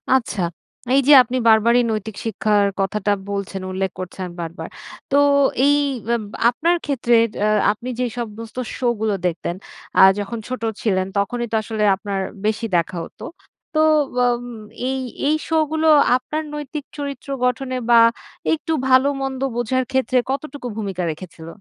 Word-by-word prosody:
আচ্ছা, 235 -5 -1 0.6
এইযে 275 +1 +4
আপনি 250 +2 -3
বারবারই 230 +2 +5
নৈতিক 215 -1 -4
শিক্ষার 210 -2 +2
কথাটা 205 +1 0 0.2
বলছেন। 200 -1 -4
উল্লেখ 190 0 -2
করছেন 185 0 -5
বারবার। 170 +2 -6 0.4
তো 280 - +4 0.5
এই 290 0 +5 0.4
আব 225 - -3 0.3
আপনার 330 +8 +1
ক্ষেত্রে 245 -4 +1 0.3
আ - - +3 0.2
আপনি 235 +4 -7
যে 250 - +1
সমস্ত 230 0 -7 0.2
শোগুলো 220 -4 0
দেখতেন 170 0 -3 0.4
আ - - +9 0.2
যখন 205 +3 -4
ছোট 255 -2 -5 0.2
ছিলেন, 190 -4 +1
তখনই 240 +4 -1
তো - - 0
আসলে 215 0 -2
আপনার 200 0 -4 0.3
বেশি 220 +2 0
দেখা 175 +1 0
হতো। - - -14 0.5
তো 310 - +1 0.4
ব - - -5 0.7
এই 265 - -1 0.3
এই 305 - +3
শোগুলো 315 0 +1 0.3
আপনার 305 +5 -4
নৈতিক 295 0 -5
চরিত্র 280 -2 -6 0.2
গঠনে 255 +1 -1
বা, 235 -1 +7 0.5
একটু 320 +1 -3 0.2
ভালোমন্দ 270 0 +2
বোঝার 250 +2 0
ক্ষেত্রে 260 -1 +1
কতটুকু 280 -1 -5
ভূমিকা 195 -4 -3
রেখেছিল? 160 0 -10
235 Hz, 140 wpm, -21 LUFS, 200-265 Hz, 0.7 s, আ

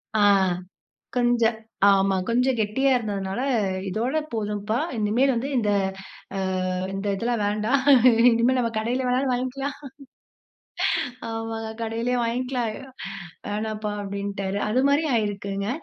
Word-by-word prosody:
ஆ, - - +3 1.0
கொஞ்சம் 240 -2 +3 0.3
ஆமா. 195 0 +3
கொஞ்சம் 250 +2 +2
கெட்டியா 220 +6 +1
இருந்ததுனால, 200 -1 -3 0.5
"இதோட 235 +10 -1 0.2
போதும்ப்பா 210 0 -1 0.2
இனிமேல் 225 +6 +2
வந்து 245 +4 -2
இந்த, 215 -4 +1 0.7
அ - - -1 0.5
இந்த 195 +1 -3
இதெல்லாம் 230 +2 -1
வேண்டாம். 215 +6 +1 0.5
இனிமேல 235 +3 +3
நம்ம 230 -2 0
கடையில 245 +4 -1
வேணாலும் 255 +1 +1
வாங்கிக்கலாம்." 265 +3 -3 1.5
ஆமாங்க, 225 0 -4
"கடையிலேயே 230 +2 -1
வாங்கிக்கலாம். 245 0 -1 0.8
வேணாம்ப்பா" 210 0 -3
அப்டின்ட்டாரு. 200 0 -3
அது 250 +5 +2
மாரி 285 +3 +3
ஆயிருக்குங்க. 200 -2 -2
225 Hz, 105 wpm, -24 LUFS, 210-250 Hz, 1.5 s, ஆ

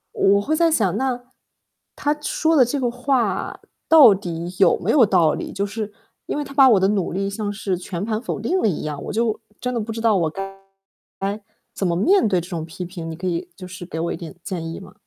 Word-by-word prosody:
我 200 +1 +4
会 310 +9 0
在 335 0 +3
想， 205 - +2
那， 255 -2 -1 0.7
他 295 0 0
说 320 +2 +1
的 265 - +7
这 270 +4 -1
个 245 -2 +1
话 245 -5 -1 0.3
到 290 -10 +9
底 175 -2 -5
有 195 - +5
没 190 +5 0
有 255 -7 +6
道 170 -6 +3
理。 - - -5
就 200 +1 -2
是， 210 0 -5 0.4
因 - - -2
为 295 - -1
他 275 0 -10
把 270 -2 +7
我 205 -5 +5
的 190 - +3
努 200 -4 0
力 195 +2 -1
像 205 0 -3
是 195 -2 -2
全 180 +1 -5
盘 220 0 -2
否 245 - -4
定 350 - 0
了 - - +3
一 175 - -2
样， 150 -2 -4
我 - - -4
就 220 0 0 0.2
真 250 0 -2
的 235 - -1
不 225 +1 -4
知 225 - -5
道 225 -2 +3
我 165 -3 +1
该 195 +3 -6 0.6
该 200 +2 -2 0.3
怎 190 - -1
么 170 - 0
面 345 - +4
对 185 -3 +2
这 175 - -7
种 170 -4 -4
批 170 +2 -7
评， 170 -2 -7
你 160 - -5
可 180 +3 -7
以 175 0 -2
就 185 -1 -9
是 185 -1 -8
给 160 - -5
我 170 - -1
一 - - -5
点 170 +2 -9
建 165 -4 -4
议 - - -6
吗？ 190 -1 -13
200 Hz, 265 characters per minute, -22 LUFS, 180-240 Hz, 0.7 s, 到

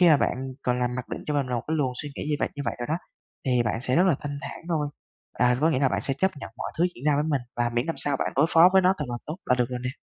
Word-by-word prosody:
Khi 180 - +7
mà 155 - +7
bạn 140 - +1 0.3
còn 125 0 +1
làm 125 0 0
mặc 125 0 -5
định - - -5
cho 150 - -1
mình 140 -2 +1
là 125 - -2
một 120 - -1
cái 160 - +1
luồng 135 -4 +1
suy 145 - -6
nghĩ - - -4
như 150 - +2
vậy, - - 0
như 145 - -3
vậy - - 0
rồi 120 - -3
đó, 160 +3 0 0.5
thì 125 -2 +3
bạn 115 +1 -1
sẽ 130 0 +1
rất 180 - +5
là 175 - +4
thanh 145 -1 -4
thản - - -6
thôi. 155 -3 0 0.4
À, 125 0 +3
thì 125 - -4
có 160 +2 +4
nghĩa 150 - +1
là 135 - +4
bạn - - -1
sẽ 135 - -1
chấp 190 +7 +2
nhận 140 - -8
mọi - - -5
thứ 175 - +4
diễn 125 - -11
ra 150 -1 +4
với 145 +1 +1
mình, 145 -3 +1 0.2
và 120 0 +1
miễn 120 +2 0
làm 165 - -2
sao 145 -1 0
bạn - - -1
đối 145 +3 +5
phó 165 +2 +8
với 190 0 +6
nó 185 +1 +4
thật 150 - -1
là 120 - -2
tốt 155 +3 -4
là 125 - +4
được 125 0 +2
rồi 125 - -3
nè. 125 - -1
140 Hz, 360 wpm, -26 LUFS, 125-155 Hz, 0.5 s, phó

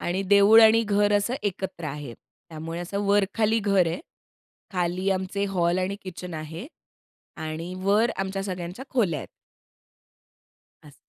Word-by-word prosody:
आणि 180 +3 -1
देऊळ 200 +3 +8
आणि 225 +1 +6
घर 205 -1 +2
असं 220 +5 0
एकत्र 190 -3 -4
आहे. 140 -4 -6
त्यामुळे 165 +1 -9
असं 200 +3 -3
वर-खाली 205 +2 +2
घर 200 -4 +3
आहे. 165 - -2 0.7
खाली 180 +1 -1
आमचे 190 +1 -1
हॉल 175 0 +2
आणि 190 +2 -1
किचन 180 -2 -7
आहे. 160 - -7 0.7
आणि 160 +3 -5
वर 210 +4 +3
आमच्या 195 0 -3
सगळ्यांच्या 180 +5 -5
खोल्या 195 - +1
आहेत. - - -9 1.6
असं. 150 -2 -15
190 Hz, 135 wpm, -25 LUFS, 170-205 Hz, 1.6 s, देऊळ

